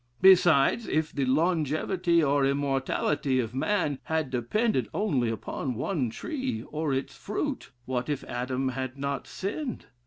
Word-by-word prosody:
Besides, 180 +1 +6
if 155 0 0
the 140 -2 0
longevity, 165 +4 +2
or 140 -1 +3
immortality 135 0 +1
of 115 -2 -2
man 145 -1 0
had 160 -4 -1
depended 130 - 0
only 145 - +1
upon 120 +3 -3
one 130 - -1
tree, 260 - -4
or 155 -1 -1
its 135 0 -2
fruit, - - -3 0.2
what 125 +1 -2
if 145 -2 -2
Adam 130 +2 -2
had 130 +1 -4
not 140 0 -3
sinned? 240 +7 -4
140 Hz, 135 wpm, -28 LUFS, 130-175 Hz, 0.2 s, Besides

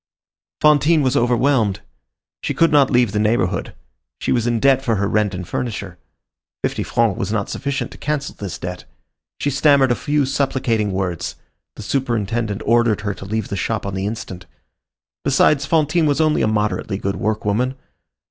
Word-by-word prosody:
Fantine 150 +1 +4
was 130 +1 +1
overwhelmed. 120 -4 +2 0.6
She - - -2
could 165 - +3
not 145 -3 +5
leave 120 -4 +3
the 105 - -1
neighborhood; 110 +3 0 0.4
she - - -2
was 120 -2 +1
in 120 -1 +1
debt 135 +1 +4
for 120 -4 0
her 100 0 0
rent 105 -2 +1
and 90 -1 -6
furniture. 100 -7 -4 0.6
Fifty - - -1
francs 115 -4 0
was 100 - -2
not 105 -3 -1
sufficient 140 -3 -3
to - - -13
cancel 150 -2 -2
this 100 -4 -6
debt. 90 0 -6 0.5
She 145 - 0
stammered 140 -1 +4
a - - +3
few 145 +1 0
supplicating 130 -6 0
words. 95 -3 -3 0.4
The - - -8
superintendent 115 -5 -1
ordered 115 -2 +3
her 100 -1 -2
to 95 - -10
leave 110 +1 -3
the - - -3
shop 110 +2 -2
on 100 - -3
the 95 +1 -2
instant. 105 -4 -6 0.8
Besides, 140 -2 +3
Fantine 160 +1 +2
was 145 0 +1
only 155 -1 +2
a - - +2
moderately 105 -1 -1
good 100 0 -3
workwoman. 110 +5 -1
115 Hz, 170 wpm, -20 LUFS, 100-140 Hz, 0.8 s, not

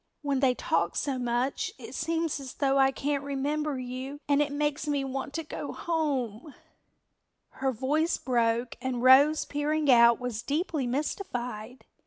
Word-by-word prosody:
When 280 -2 0
they 255 -2 +3
talk - - 0
so 270 -3 -1
much 245 +2 -1
it 245 -1 -10
seems 325 +1 -1
as 265 -2 -8
though 275 -1 +2
I 270 0 +5
can't 280 +1 -2
remember 285 +1 -2
you 255 +3 -6
and 285 0 +3
it 295 -1 0
makes 295 0 -1
me 285 -2 0
want 270 +1 -4
to 325 - -2
go 305 - -6
home." 285 -6 -2 0.9
Her 265 0 -2
voice 290 +7 0
broke 235 -1 0
and 250 -2 -2
Rose 280 +4 +6
peering 295 0 +1
out 235 -1 +6
was 245 -3 -4
deeply 290 +1 -1
mystified. 250 - -4
270 Hz, 155 wpm, -28 LUFS, 250-295 Hz, 0.9 s, Rose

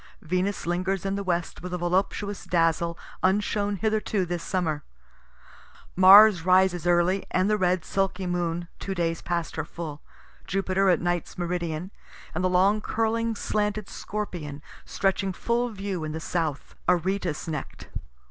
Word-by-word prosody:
Venus 185 +4 -1
lingers 185 +2 -1
in 195 - 0
the 200 0 -2
west 175 -2 -2
with 180 0 -4
a - - -2
voluptuous 190 +3 -1
dazzle 170 0 +1 0.2
unshown 205 +1 +1
hitherto 215 -1 0
this 175 -1 -3
summer. 165 -6 -1 1.1
Mars 190 0 +8
rises 185 -1 +3
early, 175 +2 +3
and 185 +1 +1
the 210 - +3
red 180 -4 +1
sulky 195 +1 -1
moon, 175 -1 -2
two 195 - -4
days 165 -2 -1
past 170 -2 -3
her - - 0
full; 155 -3 -7 0.5
Jupiter 195 0 +1
at 175 - +3
night's 175 -1 -2
meridian, 175 0 -3 0.4
and 175 - -2
the 185 - +3
long 195 +4 +3
curling 230 +1 0
slanted 210 -1 -1
Scorpion 165 -9 -5 0.2
stretching 195 -1 0
full 235 +5 0
view 195 -5 -4
in 155 0 -4
the 160 - -3
south, 160 -3 -3 0.2
Aretus 180 -2 0
neck'd. 155 -4 -5
185 Hz, 145 wpm, -26 LUFS, 170-195 Hz, 1.1 s, Mars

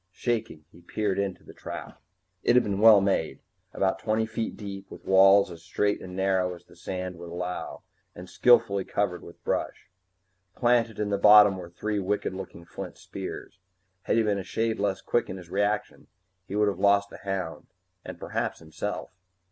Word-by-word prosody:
Shaking, 110 -9 -3
he 85 - -17
peered 100 +2 -2
into 100 -2 -3
the - - -13
trap. - - -8 0.4
It 120 - +3
had 125 - +6
been 100 -1 -2
well 110 -2 +8
made 95 -5 0 0.3
about 95 0 0
twenty 110 +2 0
feet 115 0 -4
deep, 100 -2 -8
with - - -12
walls 95 0 +6
as 85 -1 -10
straight 100 +3 -1
and 90 0 -8
narrow 95 -1 +1
as 85 - -17
the - - -19
sand 90 -2 -5
would 85 0 -8
allow, 90 +1 -5 0.3
and 90 +1 -9
skillfully 100 -5 +4
covered 95 -3 -1
with 85 - -14
brush. - - -3 0.6
Planted 120 -3 +2
in 105 -1 -1
the 100 - 0
bottom 105 -1 +8
were 90 -2 -8
three 105 +4 -3
wicked 100 0 -1
looking 95 -3 -8
flint - - -8
spears. 95 - -8 0.4
Had - - 0
he 115 - +4
been 105 -2 0
a - - -5
shade 110 +3 -1
less 100 -1 -1
quick 120 - 0
in 95 - -5
his 85 -2 -12
reactions, 105 +2 -1 0.4
he 100 - -5
would 105 0 +3
have 100 -3 -1
lost 100 0 +3
the - - -9
hound 95 -4 -4 0.4
and - - -8
perhaps - - -3
himself. 80 -1 -5
100 Hz, 185 wpm, -27 LUFS, 90-105 Hz, 0.6 s, well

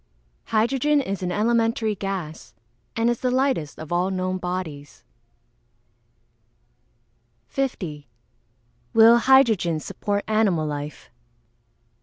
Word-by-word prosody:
_ - - -42 0.5
Hydrogen 265 +7 +2
is 195 -8 -3
an 180 -1 -2
elementary 225 +1 +1
gas, 195 -6 -6 0.4
and 230 0 +1
is 240 -1 +1
the 255 - 0
lightest 255 - 0
of 155 0 -9
all 175 +2 +1
known 185 0 -2
bodies. 180 -6 -6 2.4
50. 160 - -4 0.9
_Will 225 +1 +7
hydrogen 230 - +4
support 205 +5 -3
animal 210 -7 +2
life? 145 -2 -6
200 Hz, 100 wpm, -23 LUFS, 170-235 Hz, 2.4 s, Will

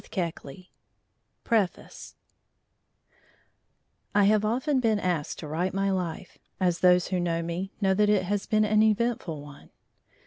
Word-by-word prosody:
PREFACE 215 -6 -2 2.0
I 205 - +5
have 210 +1 +3
often 260 +6 0
been 220 -4 +1
asked 175 -6 -2
to 155 - -7
write 175 +5 -2
my 195 0 +1
life, 180 -4 -4 0.2
as 180 -2 +1
those 180 -1 +4
who 185 -1 0
know 170 -1 -1
me 175 +3 -4
know 190 -1 +3
that 210 +2 +2
it 205 -3 +3
has 200 +2 -2
been 215 0 +2
an 215 0 +3
eventful 215 -7 0
one. 145 -1 -14
195 Hz, 135 wpm, -27 LUFS, 175-215 Hz, 2.0 s, I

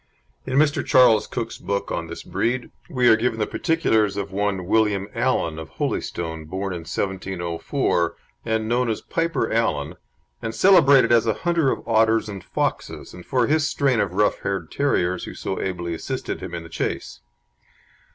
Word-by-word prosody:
In 130 0 0
Mr. 145 0 +3
Charles 115 -4 +5
Cook's 115 -2 -5
book 100 0 -3
on - - -3
this - - -8
breed, 120 +1 -2 0.2
we 125 -6 +2
are 110 - +8
given 110 -1 0
particulars 110 - +1
of 100 -1 -3
one 95 -2 -1
William 105 -1 +2
Allan, 80 -1 0
of 80 - -8
Holystone, 80 -2 -3
born 95 +4 -4
in 85 - -4
1704, 85 - -2 0.3
and 110 -1 -1
known 120 +1 +1
as 110 - -2
Piper 165 -6 -1
Allan, 80 -10 0 0.5
and 115 - -4
celebrated 145 -10 +6
as 115 -1 +4
a 110 - +2
hunter 170 -5 +3
of - - -3
otters 110 0 +3
and 100 -3 -7
foxes, - - -3
and 90 - -12
for 125 -3 +2
his 150 +1 +2
strain 135 -5 +1
of 95 -4 0
rough 105 +2 +2
haired 95 -5 -3
terriers 90 -11 0
who - - -8
so 95 - -4
ably 85 -2 -3
assisted 130 +10 -4
him 90 -2 -6
in 85 - -5
the 85 - -11
chase. 65 -5 -4
110 Hz, 170 wpm, -23 LUFS, 90-125 Hz, 0.5 s, are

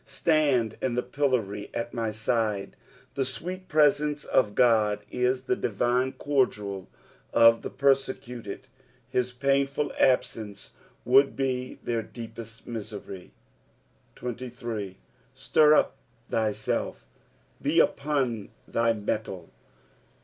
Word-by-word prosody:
Btand 140 -5 +1
in 125 -2 0
the 125 - 0
pillory 115 -8 -1
;it 115 0 -3
my 115 -2 -1
side. 110 -2 -1 0.4
The 135 - 0
sweet 180 +8 -5
presence 150 -1 +3
of 105 -5 +2
God 105 -4 +3
is 125 +1 +1
the 190 - +1
divine 120 - 0
cordial 105 - -1 0.4
of 115 0 +6
the - - -5
persecuted; 130 -5 -1 0.5
hU 125 - +3 0.2
painful 140 +1 +1
absence 110 -5 +1 0.3
would 135 +2 +5
be 130 -2 -2
their 115 -1 -1
deepest 115 0 -9
misery. 105 -5 -7 0.8
%3. 120 -5 -5 0.2
" - - -36
Stir 155 0 +5
vp - - +3 0.4
thyielf." 110 -1 -1 0.6
Be - - +2
upon 135 -7 +1 0.2
thy 115 0 +2
mettle. 105 -4 -4
120 Hz, 105 wpm, -27 LUFS, 110-135 Hz, 0.8 s, of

